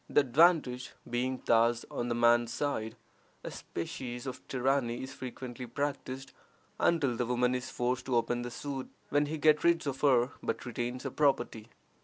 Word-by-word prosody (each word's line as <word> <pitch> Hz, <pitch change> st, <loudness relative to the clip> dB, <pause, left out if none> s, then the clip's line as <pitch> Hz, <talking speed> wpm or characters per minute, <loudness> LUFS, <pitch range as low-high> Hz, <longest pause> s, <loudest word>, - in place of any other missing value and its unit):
The -, -, +5 dB
advantage 140 Hz, -2 st, +3 dB
being 125 Hz, +2 st, -1 dB
thus 115 Hz, 0 st, +3 dB
on 120 Hz, -, -2 dB
the 120 Hz, -, 0 dB
man's 120 Hz, 0 st, +4 dB
side, 115 Hz, -5 st, -2 dB, 0.5 s
a -, -, -5 dB
species 120 Hz, +8 st, -5 dB
of 130 Hz, -, -5 dB
tyranny 130 Hz, -2 st, 0 dB
is 130 Hz, 0 st, -7 dB
frequently 125 Hz, -1 st, -7 dB
practiced 135 Hz, 0 st, -4 dB, 0.5 s
until 145 Hz, -8 st, +2 dB
the 120 Hz, 0 st, -1 dB
woman 125 Hz, 0 st, +2 dB
is 125 Hz, +1 st, -3 dB
forced 125 Hz, 0 st, -1 dB
to 130 Hz, -, +1 dB
open 120 Hz, +1 st, +1 dB
the 120 Hz, -, -4 dB
suit, 135 Hz, +1 st, -5 dB, 0.2 s
when 145 Hz, +1 st, +2 dB
he 160 Hz, +2 st, -3 dB
gets 155 Hz, 0 st, +4 dB
rid 170 Hz, -1 st, +3 dB
of 135 Hz, -2 st, -3 dB
her, 130 Hz, -3 st, +4 dB
but -, -, -3 dB
retains 120 Hz, +1 st, -3 dB
her 135 Hz, -, -3 dB
property. 135 Hz, -7 st, +1 dB
125 Hz, 170 wpm, -31 LUFS, 120-140 Hz, 0.5 s, The